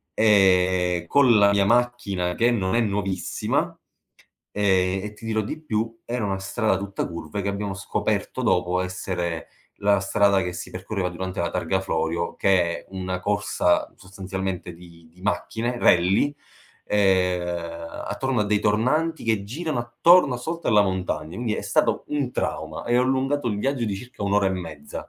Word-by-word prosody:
ehm, 90 -4 +3
con 125 0 +5
la 100 0 +5
mia 100 -1 +3
macchina 115 -6 +1
che 120 +5 +3
non 95 -3 0
è 120 - +3
nuovissima, 100 -4 -1 0.8
ehm, 95 -2 +2
e 105 - -6
ti 105 - -13
dirò 110 -1 0
di 130 +9 -5
più, 115 -4 -2
era 120 -1 -2
una 95 -1 -2
strada 110 +3 0
tutta 100 0 -3
curve 85 +3 -5
che 100 - -1
abbiamo 100 0 -3
scoperto 95 - -2
dopo 90 +1 +2
essere 90 -2 -3 0.3
la 100 -1 +3
strada 100 0 +3
che 90 - -3
si 85 - -7
percorreva 95 0 -3
durante 95 +2 -5
la 85 - 0
Targa 95 +1 -1
Florio, 80 -1 -2
che 95 -2 +3 0.2
è - - -18
una 95 -1 -3
corsa 100 -2 +1
sostanzialmente 95 -1 -5
di 85 -1 -16
di 90 - -19
macchine, 115 +4 -2
rally, 95 +11 +4 0.5
ehm, 90 -4 0
attorno 130 -4 -1
a - - +2
dei 105 0 +1
tornanti 130 +12 +1
che 110 -3 +1
girano 150 +7 -3
attorno 125 +4 +4
sotto 165 +7 -4
alla 105 -2 +6
montagna, 95 -5 -2
quindi 115 -3 -1
è - - -4
stato - - +1
un 145 -4 -1
trauma 80 0 -3
e 120 +1 +2
ho 125 - +4
allungato 135 +1 0
il 105 - -1
viaggio 135 0 0
di 100 - -1
circa 125 0 -9
1 100 0 0
ora 100 -1 +3
e - - +2
mezza. 80 -6 -7
100 Hz, 165 wpm, -24 LUFS, 90-115 Hz, 0.8 s, alla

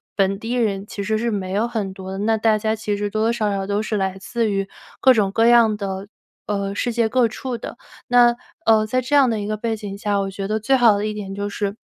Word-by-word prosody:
本 195 0 +1
地 225 +3 -4
人 205 -5 0
其 200 - -5
实 220 +2 0
是 235 +1 0
没 195 -4 -3
有 210 +4 +1
很 210 -5 -3
多 190 -1 -8
的， 190 - -5
那 220 +2 +1
大 215 0 +3
家 220 +1 -1
其 210 -2 -3
实 205 0 -1
多 215 - -1
多 225 +1 +2
少 215 -3 0
少 195 -1 -2
都 205 +1 0
是 215 0 -2
来 190 -1 -1
自 230 +3 -1
于 195 -1 -1 0.3
各 260 - +6
种 205 -4 +1
各 225 +3 +2
样 230 -3 +5
的 195 -1 -5 0.4
呃， 200 -1 -2
世 240 +4 -1
界 230 -1 +1
各 245 +1 +3
处 250 +3 -5
的。 230 - -8 0.3
那 240 -1 +5 0.3
呃， 220 -1 +4
在 255 +4 +1
这 255 +4 -1
样 275 -3 +5
的 225 -2 -1
一 205 - -4
个 215 +1 -2
背 225 +1 -2
景 205 -2 -7
下， 205 0 0
我 195 0 -3
觉 195 0 -5
得 215 +1 -1
最 245 +6 +2
好 235 -5 +5
的 205 - -2
一 215 - -2
点 195 -2 -6
就 200 0 -3
是， 200 0 -3
215 Hz, 290 characters per minute, -21 LUFS, 200-230 Hz, 0.4 s, 各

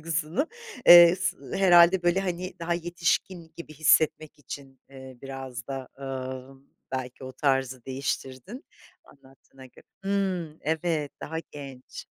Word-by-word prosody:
duygusunu. 165 - -2 0.4
Eee, 175 +1 +10
s 180 -1 -2 0.2
herhâlde 175 -1 +6
böyle, 175 +2 +2
hani, 185 0 -4
daha 170 +1 -1
yetişkin 170 0 -2
gibi 170 -2 -9
hissetmek 155 0 +2
için, 135 -1 -10
ııı, 130 -2 -12
biraz 135 -3 -7
da, 135 -2 -6
ımm, 135 0 -7 0.3
belki 130 0 -5
o 130 - -8
tarzı 130 -3 0
değiştirdin 135 - -5 0.4
anlattığına 135 -1 -18
göre. 125 - -20 0.2
Hımm, 185 -5 -1
evet, 160 -2 -1
daha 160 +1 -5
genç. 135 -3 -10
150 Hz, 125 wpm, -26 LUFS, 130-175 Hz, 0.4 s, Eee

